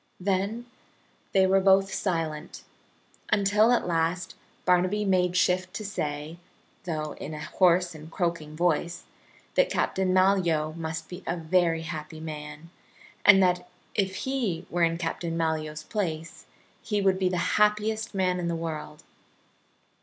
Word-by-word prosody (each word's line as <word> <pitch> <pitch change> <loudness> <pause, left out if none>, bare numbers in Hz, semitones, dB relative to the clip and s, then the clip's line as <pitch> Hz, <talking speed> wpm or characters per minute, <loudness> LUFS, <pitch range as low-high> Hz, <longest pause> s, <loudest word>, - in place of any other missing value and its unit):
Then 200 +5 -1 0.7
they 190 -1 +4
were 190 +1 +4
both 195 0 +4
silent, 165 -5 -3 0.7
until 210 +2 +4
at 245 - +2
last 170 +1 -1 0.3
Barnaby 185 +3 +2
made 180 -2 +2
shift 185 +2 +1
to 215 - -4
say, 150 -4 -4 0.5
though 155 -3 -3
in 155 - -5
a 150 - -6
hoarse 180 -1 +3
and 155 0 -11
croaking 170 -4 -2
voice, 170 +1 0 0.5
that - - +3
Captain 190 -1 0
Malyoe 180 -5 +2
must 160 -1 -5
be 180 +1 -9
a 170 - -1
very 165 0 +1
happy 160 -1 -6
man, 150 0 -8 0.5
and 195 -2 +8
that 180 0 +1 0.2
if 190 -2 0
he 245 -11 -1
were 175 - -1
in 165 0 +3
Captain 165 0 -3
Malyoe's 155 -2 -2
place 165 -5 -4 0.3
he 210 -2 -1
would 190 -1 +2
be 185 -1 +2
the 180 - -1 0.2
happiest 210 +1 +1
man 185 -1 +1
in 175 - -2
the 170 - -1
world. 160 -2 -5
180 Hz, 140 wpm, -27 LUFS, 160-190 Hz, 0.7 s, and